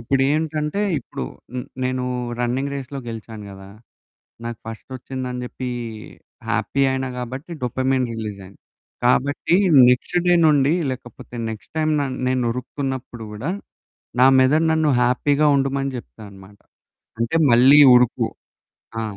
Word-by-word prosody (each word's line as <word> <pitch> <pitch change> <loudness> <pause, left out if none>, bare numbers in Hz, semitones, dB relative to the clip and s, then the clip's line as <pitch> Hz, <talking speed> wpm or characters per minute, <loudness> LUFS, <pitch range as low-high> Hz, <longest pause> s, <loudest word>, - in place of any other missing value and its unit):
ఇప్పుడేంటంటే 150 - 0 0.2
ఇప్పుడు 90 - -7 0.3
హ్మ్, 125 -1 -4 0.2
నేను 130 0 -1 0.3
రన్నింగ్ 130 +3 -1
రేస్‌లో 140 0 -6
గెలిచాను 110 -1 -8
గదా! 95 0 -11 0.8
నాకు 115 -2 -5
ఫస్టోచ్చిందని 125 +2 -6
జేప్పీ 125 0 -5 0.8
హ్యాపీ 140 - 0
అయినా 130 0 -2
కాబట్టి 130 +6 -6
డోపమైన్ 130 +1 0
రిలీజైంది. 100 -4 -7 0.5
కాబట్టి 145 +7 +2 0.3
నెక్స్ట్ 125 +8 +1
డే 175 - +5
నుండి 145 -1 +4 0.2
లేకపోతే 120 -1 -9 0.2
నెక్స్ట్ 110 -2 -10
టైమ్ 155 0 +1
న 140 - +1 0.2
నేను 130 -1 +1
ఉరుకుతున్నప్పుడు 125 -2 -5
కూడా 115 +10 -4 0.7
నా 130 - +8
మెదడు 155 +5 +3
నన్ను 160 -2 +2
హ్యాపీగా 140 +4 +2
ఉండమని 135 0 0
చెప్తాదన్నమాట. 100 -4 -12 0.6
అంటే 115 +7 0 0.2
"మళ్ళీ 130 +5 +7 0.2
ఉరుకు" 125 -1 +3 0.7
ఆ! - - -2
130 Hz, 115 wpm, -21 LUFS, 120-140 Hz, 0.8 s, నా